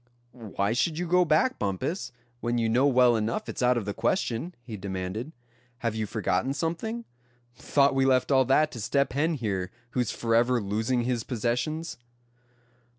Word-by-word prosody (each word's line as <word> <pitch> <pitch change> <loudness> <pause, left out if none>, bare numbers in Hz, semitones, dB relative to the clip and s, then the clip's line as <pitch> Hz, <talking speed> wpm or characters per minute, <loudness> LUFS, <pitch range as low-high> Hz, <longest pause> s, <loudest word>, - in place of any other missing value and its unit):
"Why 110 -3 -2
should 155 +6 0
you 175 - -1
go 180 +1 +4
back, 165 - +2
Bumpus, 100 - -2 0.3
when 120 0 -1
you 115 -1 +1
know 125 +5 +3
well 125 -3 +5
enough 110 +1 -1
it's - - -5
out 125 0 +3
of 110 - -2
the 100 - -3
question?" 120 - -1
he 115 -3 -7
demanded. 95 +6 -4 0.5
"Have 115 - +1
you 110 -1 -2
forgotten 115 +5 -1
something? 220 +10 -3 0.5
Thought 140 +2 +2
we 135 0 +2
left 130 0 +2
all 130 -1 +5
that 150 +4 +3
to 115 - -7
Step 140 +5 +1
Hen 155 +4 +1
here, 100 -8 -2 0.2
who's 125 -3 0
forever 120 +2 +2
losing 110 +4 0
his 120 -2 -1
possessions?" 125 +7 -2
125 Hz, 165 wpm, -27 LUFS, 110-140 Hz, 0.5 s, well